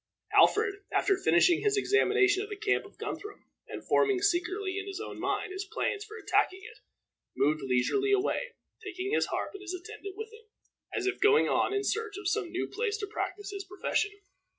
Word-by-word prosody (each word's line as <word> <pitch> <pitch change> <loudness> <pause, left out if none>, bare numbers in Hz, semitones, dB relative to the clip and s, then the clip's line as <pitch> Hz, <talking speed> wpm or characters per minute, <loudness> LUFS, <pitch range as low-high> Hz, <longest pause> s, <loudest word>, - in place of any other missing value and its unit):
Alfred, 405 -2 +4
after 400 - +3
finishing 170 - +4
his 420 -1 +2
examination 405 0 +3
of 415 - -6
the 410 - -4
camp 410 0 +1
of - - -16
Guthrum, 415 0 -6 0.2
and - - -8
forming 405 -3 +3
secretly, 375 +1 0
in 400 - -6
his 390 -1 -5
own - - -7
mind, - - -1
his 380 +1 -4
plans 410 +1 -2
for 435 +1 -10
attacking 380 -2 +1
it, - - -12 0.6
moved 155 +1 +2
leisurely 135 - +1
away, 435 +5 0 0.3
taking 390 -1 -4
his - - +2
harp - - -3
and 400 - -9
his 370 -2 -5
attendant 400 +1 -9
with 440 +1 -7
him, 445 0 -15 0.5
as 390 - -2
if 385 0 -1
going 425 +2 +5
on - - +2
in 405 0 0
search 430 -1 -2
of 400 -2 -4
some 425 -4 0
new 355 - -1
place 440 -1 -2
to 420 - -3
practice 410 0 -4
his 400 -1 -5
profession. 395 +2 -1
400 Hz, 195 wpm, -30 LUFS, 375-420 Hz, 0.6 s, going